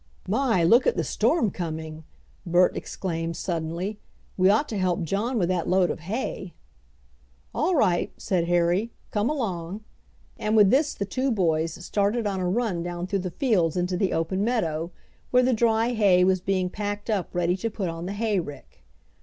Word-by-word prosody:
"My, 225 Hz, -3 st, +2 dB
look 235 Hz, -, +5 dB
at 485 Hz, -, +2 dB
the -, -, +1 dB
storm 235 Hz, -, +1 dB
coming!" 160 Hz, -2 st, -6 dB, 0.4 s
Bert 180 Hz, 0 st, +3 dB
exclaimed 165 Hz, -3 st, -4 dB
suddenly. 175 Hz, +5 st, -3 dB, 0.4 s
"We 185 Hz, 0 st, +4 dB
ought 220 Hz, +9 st, +3 dB
to 215 Hz, -, -3 dB
help 180 Hz, -1 st, 0 dB
John 210 Hz, -, -1 dB
with 180 Hz, -5 st, +1 dB
that 180 Hz, -2 st, 0 dB
load 185 Hz, -1 st, +3 dB
of -, -, -5 dB
hay." 190 Hz, 0 st, -4 dB, 1.0 s
"All 345 Hz, +4 st, +1 dB
right," 180 Hz, -, +2 dB
said 180 Hz, -3 st, 0 dB
Harry, 175 Hz, +6 st, +1 dB, 0.2 s
"come 210 Hz, +3 st, 0 dB
along!" 205 Hz, -, -3 dB, 0.6 s
and 215 Hz, +1 st, 0 dB
with 210 Hz, -2 st, +6 dB
this 290 Hz, +3 st, +2 dB
the 200 Hz, -, -3 dB
two 255 Hz, +7 st, -1 dB
boys 165 Hz, -7 st, +1 dB
started 210 Hz, +4 st, 0 dB
on 195 Hz, -2 st, -1 dB
a 180 Hz, -1 st, 0 dB
run 205 Hz, -4 st, 0 dB
down 175 Hz, 0 st, -4 dB
through 195 Hz, +1 st, -1 dB
the 185 Hz, 0 st, -3 dB
fields 180 Hz, -, +1 dB
into 180 Hz, +1 st, 0 dB
the 190 Hz, +1 st, 0 dB
open 185 Hz, +4 st, -1 dB
meadow, 170 Hz, -9 st, -1 dB, 0.4 s
where 250 Hz, 0 st, +4 dB
the 255 Hz, 0 st, +3 dB
dry 225 Hz, 0 st, +2 dB
hay 195 Hz, -5 st, +4 dB
was 185 Hz, 0 st, +2 dB
being 185 Hz, -1 st, 0 dB
packed 205 Hz, 0 st, -4 dB
up 195 Hz, -5 st, -1 dB
ready 175 Hz, 0 st, +1 dB
to 230 Hz, +4 st, -2 dB
put 205 Hz, -3 st, -3 dB
on 165 Hz, +1 st, -5 dB
the 195 Hz, -, -3 dB
hay 210 Hz, -1 st, 0 dB
rick. 145 Hz, -, -9 dB
190 Hz, 180 wpm, -25 LUFS, 175-220 Hz, 1.0 s, with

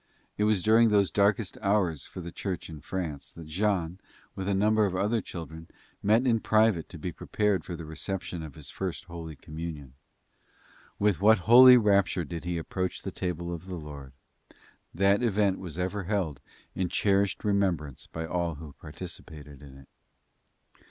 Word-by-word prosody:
It 105 Hz, -, +1 dB
was 105 Hz, -4 st, +2 dB
during 115 Hz, +1 st, +5 dB
those 100 Hz, -2 st, +3 dB
darkest 100 Hz, +1 st, +1 dB
hours 95 Hz, -8 st, +1 dB
for 90 Hz, -, -8 dB
the 85 Hz, 0 st, -7 dB
Church 90 Hz, -2 st, -5 dB
in 75 Hz, -2 st, -9 dB
France, 80 Hz, -4 st, -5 dB
that 85 Hz, -, -10 dB
Jean, 90 Hz, +1 st, -1 dB, 0.3 s
with 95 Hz, 0 st, -5 dB
a 100 Hz, -, +1 dB
number 105 Hz, +1 st, +3 dB
of 95 Hz, -, -4 dB
other 105 Hz, +4 st, +1 dB
children, 80 Hz, -2 st, -8 dB, 0.3 s
met 110 Hz, +5 st, +3 dB
in 115 Hz, -3 st, +3 dB
private 110 Hz, -6 st, +2 dB
to 85 Hz, -, -9 dB
be 90 Hz, +3 st, -4 dB
prepared 105 Hz, +3 st, 0 dB
for 90 Hz, -, -6 dB
the 85 Hz, -1 st, -8 dB
reception 85 Hz, +2 st, -5 dB
of 80 Hz, -3 st, -9 dB
his 75 Hz, -1 st, -9 dB
First 95 Hz, -3 st, -4 dB
Holy 85 Hz, -3 st, -8 dB
Communion. 75 Hz, -2 st, -7 dB, 1.0 s
With 100 Hz, -4 st, +1 dB
what 110 Hz, +2 st, +6 dB
holy 125 Hz, +2 st, +10 dB
rapture 100 Hz, -5 st, +2 dB
did 85 Hz, +1 st, -6 dB
he 90 Hz, -1 st, -2 dB
approach 90 Hz, +3 st, -3 dB
the -, -, -4 dB
table 85 Hz, -1 st, -3 dB
of 85 Hz, +2 st, -8 dB
the 95 Hz, -, -5 dB
Lord. 75 Hz, -4 st, -9 dB, 0.8 s
That 100 Hz, +4 st, +3 dB
event 105 Hz, -4 st, +1 dB
was 85 Hz, -4 st, -8 dB
ever 95 Hz, +2 st, -2 dB
held 90 Hz, -8 st, -1 dB, 0.3 s
in 95 Hz, -2 st, -1 dB
cherished 100 Hz, 0 st, +1 dB
remembrance 95 Hz, -, -1 dB
by 80 Hz, 0 st, -4 dB
all 85 Hz, 0 st, -2 dB
who 75 Hz, -1 st, -10 dB
participated 75 Hz, -3 st, -9 dB
in 70 Hz, -2 st, -13 dB
it. 70 Hz, -1 st, -16 dB
90 Hz, 170 wpm, -28 LUFS, 80-100 Hz, 1.0 s, holy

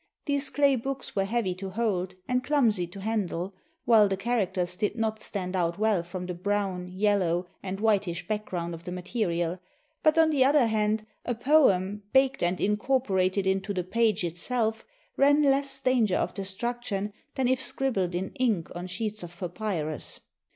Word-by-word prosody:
These 285 Hz, 0 st, 0 dB
clay 280 Hz, -2 st, +3 dB
books 270 Hz, +2 st, -4 dB
were 195 Hz, -1 st, +2 dB
heavy 210 Hz, -3 st, 0 dB
to 190 Hz, +2 st, -6 dB
hold 190 Hz, -3 st, -1 dB
and 250 Hz, 0 st, +1 dB
clumsy 235 Hz, -11 st, +2 dB
to 190 Hz, +3 st, -10 dB
handle, 195 Hz, -3 st, -2 dB, 0.3 s
while 220 Hz, -3 st, +6 dB
the 195 Hz, -1 st, -1 dB
charac 210 Hz, -2 st, 0 dB
ters 180 Hz, -1 st, -1 dB
did 205 Hz, +3 st, -1 dB
not 220 Hz, -2 st, -1 dB
stand 190 Hz, -3 st, -4 dB
out 170 Hz, -2 st, 0 dB
well 215 Hz, -3 st, +2 dB
from 180 Hz, +1 st, -6 dB
the 180 Hz, -, -4 dB
brown, 190 Hz, 0 st, -1 dB
yellow, 185 Hz, -2 st, +1 dB, 0.2 s
and 195 Hz, 0 st, -4 dB
whitish 205 Hz, -6 st, +1 dB
background 185 Hz, -5 st, -3 dB
of 165 Hz, 0 st, -8 dB
the 180 Hz, -, -6 dB
material; 180 Hz, -2 st, -2 dB, 0.4 s
but, 310 Hz, +1 st, +4 dB
on 320 Hz, -1 st, +5 dB
the 280 Hz, -4 st, +4 dB
other 275 Hz, -1 st, +5 dB
hand, 215 Hz, -1 st, +1 dB, 0.2 s
a 245 Hz, -, -2 dB
poem, 210 Hz, -7 st, +3 dB
baked 270 Hz, 0 st, +4 dB
and 175 Hz, +1 st, +1 dB
incorporated 205 Hz, -3 st, +1 dB
into 195 Hz, +1 st, 0 dB
the 180 Hz, -, 0 dB
page 220 Hz, +1 st, +1 dB
itself, 220 Hz, +6 st, -1 dB, 0.3 s
ran 285 Hz, +2 st, +5 dB
less 275 Hz, -1 st, +2 dB
danger 245 Hz, -7 st, +2 dB
of -, -, 0 dB
destruction 205 Hz, +1 st, -3 dB, 0.2 s
than 260 Hz, -2 st, +1 dB
if 260 Hz, +1 st, +2 dB
scribbled 245 Hz, -9 st, -1 dB
in 190 Hz, +2 st, -2 dB
ink 220 Hz, -10 st, +1 dB
on 175 Hz, +1 st, -5 dB
sheets 210 Hz, +3 st, -4 dB
of 175 Hz, 0 st, -9 dB
papyrus. 175 Hz, -4 st, -4 dB
205 Hz, 170 wpm, -28 LUFS, 180-240 Hz, 0.4 s, while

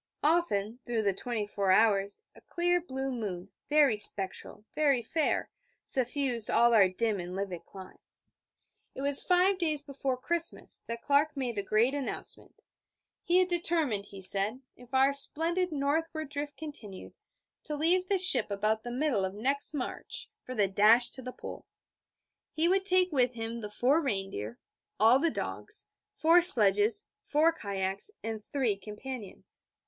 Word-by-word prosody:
Often, 250 Hz, -9 st, 0 dB
through 230 Hz, -2 st, -3 dB
the 200 Hz, -1 st, 0 dB
twenty 225 Hz, +1 st, -4 dB
four 200 Hz, -1 st, -3 dB
hours, 200 Hz, 0 st, +1 dB
a -, -, -19 dB
clear 350 Hz, 0 st, -1 dB
blue 265 Hz, -4 st, -5 dB
moon, 200 Hz, -6 st, -6 dB, 0.2 s
very 290 Hz, -7 st, +3 dB
spectral, 205 Hz, 0 st, +2 dB
very 280 Hz, -5 st, +1 dB
fair, 315 Hz, +7 st, -2 dB, 0.3 s
suffused 255 Hz, -3 st, 0 dB
all 235 Hz, 0 st, +3 dB
our 200 Hz, -4 st, +5 dB
dim 210 Hz, +2 st, -2 dB
and 175 Hz, +1 st, -7 dB
livid 185 Hz, -4 st, -6 dB
clime. 190 Hz, -1 st, -13 dB, 1.0 s
It 270 Hz, -, -6 dB
was 280 Hz, 0 st, +3 dB
five 370 Hz, +1 st, +2 dB
days 310 Hz, -4 st, -2 dB
before 275 Hz, -2 st, -4 dB
Christmas 335 Hz, +6 st, -2 dB
that 230 Hz, 0 st, -7 dB
Clark 290 Hz, +1 st, +1 dB
made 250 Hz, -4 st, -3 dB
the 200 Hz, -, -2 dB
great 215 Hz, +6 st, 0 dB
announcement: 285 Hz, -, -3 dB, 0.6 s
he 350 Hz, -, +1 dB
had 370 Hz, -1 st, +3 dB
determined, 325 Hz, -, 0 dB
he 195 Hz, -, -12 dB
said, 200 Hz, +7 st, +5 dB
if 245 Hz, 0 st, -18 dB
our 270 Hz, +1 st, +2 dB
splendid 335 Hz, +5 st, +2 dB
northward 310 Hz, +1 st, -3 dB
drift 290 Hz, 0 st, -6 dB
continued, 285 Hz, -11 st, -8 dB, 0.5 s
to 300 Hz, -, -3 dB
leave 350 Hz, +5 st, +1 dB
the 395 Hz, -, +1 dB
ship 380 Hz, -, +5 dB
about 215 Hz, +2 st, -1 dB
the 240 Hz, -, -8 dB
middle 250 Hz, -4 st, -1 dB
of 190 Hz, +1 st, -4 dB
next 275 Hz, +6 st, 0 dB
March 285 Hz, -5 st, -4 dB
for 255 Hz, -, -8 dB
the 205 Hz, -3 st, +1 dB
dash 215 Hz, +5 st, +3 dB
to 260 Hz, -, -7 dB
the 255 Hz, 0 st, -7 dB
Pole. -, -, -11 dB, 0.9 s
He 320 Hz, +2 st, 0 dB
would 385 Hz, +2 st, 0 dB
take 370 Hz, -1 st, +2 dB
with 250 Hz, -4 st, 0 dB
him 225 Hz, 0 st, -6 dB
the 210 Hz, -, -7 dB
four 260 Hz, +9 st, +1 dB
reindeer, 195 Hz, -, -5 dB, 0.4 s
all 225 Hz, +5 st, +5 dB
the 335 Hz, +3 st, +1 dB
dogs, -, -, -3 dB, 0.2 s
four 330 Hz, +2 st, +3 dB
sledges, 210 Hz, -, +6 dB, 0.2 s
four 315 Hz, +3 st, +1 dB
kayaks, 195 Hz, -, 0 dB
and 220 Hz, -1 st, -6 dB
three 250 Hz, -6 st, -1 dB
companions. 210 Hz, +3 st, -9 dB
255 Hz, 155 wpm, -29 LUFS, 210-305 Hz, 1.0 s, sledges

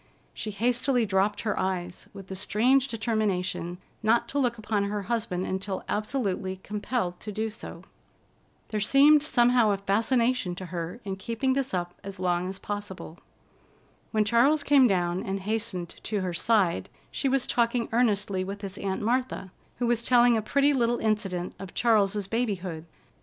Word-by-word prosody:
She 215 Hz, -, -5 dB
hastily 245 Hz, +4 st, +1 dB
dropped 205 Hz, +1 st, +1 dB
her 215 Hz, -, -1 dB
eyes, 180 Hz, -2 st, -3 dB
with 195 Hz, -, -10 dB
the 190 Hz, -, -7 dB
strange 245 Hz, +7 st, +2 dB
determination 205 Hz, -7 st, -1 dB, 0.2 s
not 230 Hz, +2 st, +2 dB
to 285 Hz, -, 0 dB
look 245 Hz, -3 st, +1 dB
upon 215 Hz, -2 st, -1 dB
her 205 Hz, 0 st, -3 dB
husband 210 Hz, -4 st, -2 dB
until 190 Hz, 0 st, -3 dB
absolutely 210 Hz, -4 st, -2 dB
compelled 205 Hz, -3 st, -2 dB
to 210 Hz, -, -6 dB
do 220 Hz, +2 st, -2 dB
so. 220 Hz, -, -9 dB, 0.9 s
There 215 Hz, -, -1 dB
seemed 280 Hz, +8 st, +6 dB
somehow 245 Hz, -5 st, +4 dB
a 200 Hz, -, +2 dB
fascination 225 Hz, +1 st, +1 dB
to 185 Hz, -, -7 dB
her 175 Hz, +4 st, -5 dB
in 190 Hz, -1 st, -3 dB
keeping 235 Hz, +6 st, -1 dB
this 270 Hz, 0 st, -1 dB
up 175 Hz, -1 st, -2 dB
as 195 Hz, -1 st, -7 dB
long 180 Hz, 0 st, 0 dB
as 190 Hz, -, -5 dB
possible. 205 Hz, -5 st, -6 dB, 0.9 s
When 215 Hz, -2 st, +1 dB
Charles 265 Hz, +7 st, +4 dB
came 275 Hz, -3 st, +6 dB
down 180 Hz, -2 st, 0 dB
and 195 Hz, 0 st, -3 dB
hastened 210 Hz, -4 st, -2 dB
to 210 Hz, -3 st, -2 dB
her 180 Hz, -1 st, -2 dB
side, 190 Hz, -1 st, +1 dB, 0.2 s
she 275 Hz, -, -1 dB
was 270 Hz, -1 st, +2 dB
talking 235 Hz, -1 st, +1 dB
earnestly 205 Hz, -5 st, +1 dB
with 200 Hz, +2 st, -6 dB
his 195 Hz, -1 st, -5 dB
Aunt 195 Hz, +1 st, -2 dB
Martha, 240 Hz, -5 st, -1 dB, 0.3 s
who 245 Hz, -, -1 dB
was 235 Hz, -1 st, +1 dB
telling 240 Hz, -1 st, +5 dB
a 220 Hz, -, +1 dB
pretty 280 Hz, +6 st, +2 dB
little 240 Hz, -2 st, +2 dB
incident 200 Hz, -6 st, -1 dB
of 195 Hz, -2 st, -9 dB
Charles's 210 Hz, -3 st, +2 dB
babyhood. 190 Hz, -8 st, -2 dB
210 Hz, 165 wpm, -27 LUFS, 190-240 Hz, 0.9 s, seemed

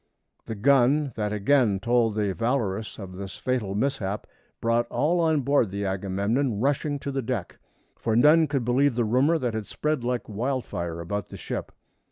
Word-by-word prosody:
The 110 Hz, -, -4 dB
gun 140 Hz, +4 st, +3 dB
that 105 Hz, -2 st, -2 dB
again 105 Hz, -1 st, +2 dB
told 115 Hz, 0 st, +2 dB
the 105 Hz, -3 st, 0 dB
Valorous 115 Hz, -3 st, -1 dB
of 95 Hz, -3 st, -8 dB
this 95 Hz, -1 st, -7 dB
fatal 120 Hz, -7 st, -2 dB
mishap 105 Hz, -4 st, -1 dB, 0.3 s
brought 115 Hz, +1 st, +1 dB
all 170 Hz, +5 st, +1 dB
on 160 Hz, -3 st, +2 dB
board 135 Hz, -4 st, +2 dB
the 100 Hz, +1 st, -3 dB
Agamemnon 100 Hz, +6 st, -1 dB
rushing 145 Hz, +3 st, 0 dB
to 140 Hz, 0 st, -5 dB
the 135 Hz, 0 st, -1 dB
deck, 115 Hz, -7 st, -4 dB, 0.4 s
for 110 Hz, -1 st, -1 dB
none 155 Hz, +6 st, +6 dB
could 135 Hz, -5 st, -1 dB
believe 130 Hz, +2 st, +2 dB
the 120 Hz, -1 st, +1 dB
rumor 130 Hz, +9 st, +3 dB
that 125 Hz, -6 st, -2 dB
had 110 Hz, -2 st, -4 dB
spread 150 Hz, -4 st, -2 dB
like 125 Hz, 0 st, -2 dB
wildfire 105 Hz, -8 st, -3 dB
about 100 Hz, +3 st, -4 dB
the -, -, -8 dB
ship. -, -, -5 dB
120 Hz, 175 wpm, -26 LUFS, 100-140 Hz, 0.4 s, none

